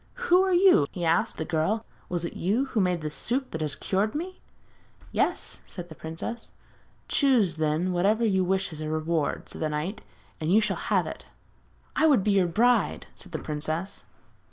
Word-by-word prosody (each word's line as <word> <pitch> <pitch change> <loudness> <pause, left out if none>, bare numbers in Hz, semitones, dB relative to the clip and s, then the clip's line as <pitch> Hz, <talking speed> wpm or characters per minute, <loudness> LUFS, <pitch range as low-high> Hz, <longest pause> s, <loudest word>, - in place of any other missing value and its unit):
'Who 375 -7 +4
are 380 0 +2
you?' 355 - +5
he 175 -2 -3
asked 165 +1 +1
the 160 - -3
girl; 180 +8 0 0.2
'was 175 -1 -1
it - - -5
you 215 +10 0
who 220 - +3
made 180 -2 +1
this 155 -1 -4
soup 255 +3 -2
that 160 - -4
has 150 -2 0
cured 205 +5 -1
me?' 365 +4 -5 0.7
'Yes,' - - -1
answered 175 -2 -8
the - - -8
princess. 165 +10 -6 0.6
'Choose, 230 - +3
then, 160 +4 0
whatever 205 +6 +2
you 190 -3 +2
wish 190 -1 0
as 155 - -6
a 155 - -3
reward,' 155 -1 -1
said - - -9
the 155 - 0
knight, 165 +8 -3 0.4
'and 160 +1 -1
you 210 - +6
shall 210 -3 0
have - - +3
it.' - - -7 0.7
'I 320 - +4
would 270 -11 +4
be 210 - +2
your 195 -3 +3
bride!' 230 +5 +2
said 185 - -11
the 160 - -2
princess. 155 +5 -4
185 Hz, 190 wpm, -27 LUFS, 160-225 Hz, 0.7 s, you